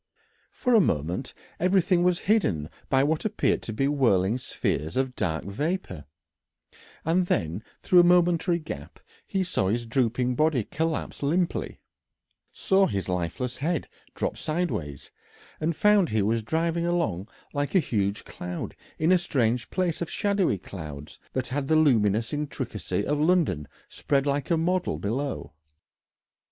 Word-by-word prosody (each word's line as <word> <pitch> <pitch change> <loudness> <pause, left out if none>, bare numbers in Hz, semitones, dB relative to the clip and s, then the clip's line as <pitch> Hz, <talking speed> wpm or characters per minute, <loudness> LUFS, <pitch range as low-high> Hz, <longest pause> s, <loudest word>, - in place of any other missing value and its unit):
For 250 - 0
a 225 - +7
moment 85 - -1 0.3
everything 180 0 +3
was 180 0 +3
hidden 100 - +1 0.2
by 135 0 +4
what 155 +2 0
appeared 215 0 +1
to - - -6
be 135 +5 0
whirling 120 -6 +2
spheres 80 - -2
of 130 -1 0
dark 80 -6 -2
vapour, 105 - -3 1.0
and 175 +3 +2
then 85 - -1 0.2
through 180 - +5
a - - +8
momentary 175 0 +4
gap 160 -2 -8 0.3
he 195 -1 0
saw 175 - 0
his 120 +4 0
drooping 125 +1 +1
body 150 -3 +2
collapse 160 +7 -3
limply, 165 +5 -1 0.7
saw 195 0 +3
his 95 -1 -3
lifeless 90 +8 -2
head 160 +3 -1 0.3
drop - - -2
sideways, 155 - -3 0.5
and 160 +1 0
found 210 -1 +4
he 110 -2 +1
was 115 +3 +1
driving 165 +7 0
along 110 - 0 0.3
like 145 +5 -2
a - - +7
huge 100 - -1
cloud 90 -1 -6 0.2
in 160 +3 +2
a 185 - +6
strange 125 -7 0
place 180 -4 -1
of 170 - -2
shadowy 200 - +1
clouds 75 -6 -9
that 130 -1 -2
had 135 +1 -2
the 155 - +3
luminous 115 -7 +3
intricacy 125 - -3
of 145 0 0
London 155 - +2 0.2
spread 140 -1 0
like 140 -1 -1
a 170 - +3
model 180 +3 0
below. 115 - -3
140 Hz, 145 wpm, -26 LUFS, 105-170 Hz, 1.0 s, a